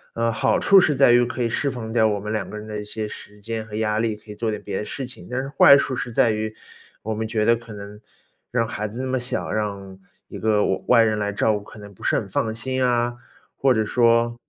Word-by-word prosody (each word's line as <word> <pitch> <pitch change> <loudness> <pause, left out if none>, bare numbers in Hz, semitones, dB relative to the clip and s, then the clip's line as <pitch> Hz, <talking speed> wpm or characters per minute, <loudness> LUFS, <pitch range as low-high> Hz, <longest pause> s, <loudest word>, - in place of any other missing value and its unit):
呃， 115 0 +1
好 - - +2
处 200 -1 +6
是 155 -5 +2
在 120 - +5
于 120 0 +5
可 120 +1 -2
以 115 - 0
释 140 +5 0
放 115 -4 -6
掉 110 -1 +3
我 105 -1 -1
们 105 +2 -4
2 110 - -3
个 105 - -7
人 105 - -8
的 105 -1 -5
一 - - -7
些 105 +1 -5
时 105 0 -11
间 110 +1 -4
和 110 -1 -9
压 110 0 0
力， 110 -1 0
可 105 0 -13
以 - - -8
做 115 +1 -2
点 105 - -3
别 - - -4
的 105 - -3
事 135 - -5
情。 120 -8 -10
但 125 +1 -2
是 135 - -4
坏 140 0 +7
处 130 -2 -1
是 120 - -4
在 115 0 +3
于 110 0 -3 0.5
我 110 - -2
们 110 +1 -3
觉 110 -1 0
得 115 - +5
可 115 -1 -11
能 105 +1 -10 0.5
让 115 -2 0
孩 105 -1 -4
子 115 +5 -6
那 - - -3
么 130 0 0
小， 125 +1 -4
让 100 -3 -4 0.3
一 - - -8
个 105 -1 +2
外- 95 - -1
外 120 -2 +6
人 110 -1 +1
来 105 0 -1
照 110 +2 +1
顾 105 - -2
可 105 - -14
能 105 -1 -11
不 - - -21
是 - - +1
很 - - -1
放 110 -1 -1
心 130 +3 -3
呀， 120 -1 +1 0.4
或 135 - +2
者 110 -3 +2
说 115 +1 +3
110 Hz, 290 characters per minute, -23 LUFS, 105-120 Hz, 0.5 s, 坏